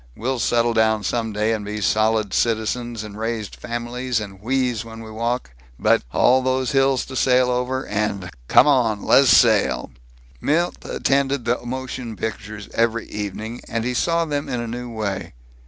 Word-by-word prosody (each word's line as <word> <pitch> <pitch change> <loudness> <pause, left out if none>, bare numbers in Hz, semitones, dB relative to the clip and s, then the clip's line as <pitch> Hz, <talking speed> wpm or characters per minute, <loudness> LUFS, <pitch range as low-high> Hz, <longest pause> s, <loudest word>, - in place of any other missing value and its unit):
We'll 130 +2 -2
settle 120 0 +2
down 110 -1 +2
some 115 +2 -1
day 105 +2 0
and 110 -2 -3
be 105 +1 -4
solid 110 0 +1
citizens 115 0 -1
and 105 0 -9
raise 110 -2 -2
families 120 +1 -3
and 100 -2 -8
wheeze 125 -1 0
when 115 0 -10
we 110 -1 -9
walk, 115 - -2 0.3
but - - +3
All 130 +1 +4
those 130 -1 0
hills 135 -1 +2
to 130 - -9
sail 125 -1 +3
over 125 +2 -1
and 105 -4 -2 0.2
Come - - +6
on! 120 -8 +2
Lez 135 -2 +5
sail!" 110 -4 +4 0.5
Milt 170 +4 0
attended 140 -2 0
the 120 +1 0
motion 125 -2 -5
pictures 105 -1 -5
every 115 0 +1
evening, 105 +3 -5
and 115 0 -1
he 125 - -1
saw 165 +6 +1
them 145 -2 -3
in 125 - -2
a 120 - -3
new 120 +1 -5
way. 100 - -4
115 Hz, 170 wpm, -22 LUFS, 110-130 Hz, 0.5 s, Come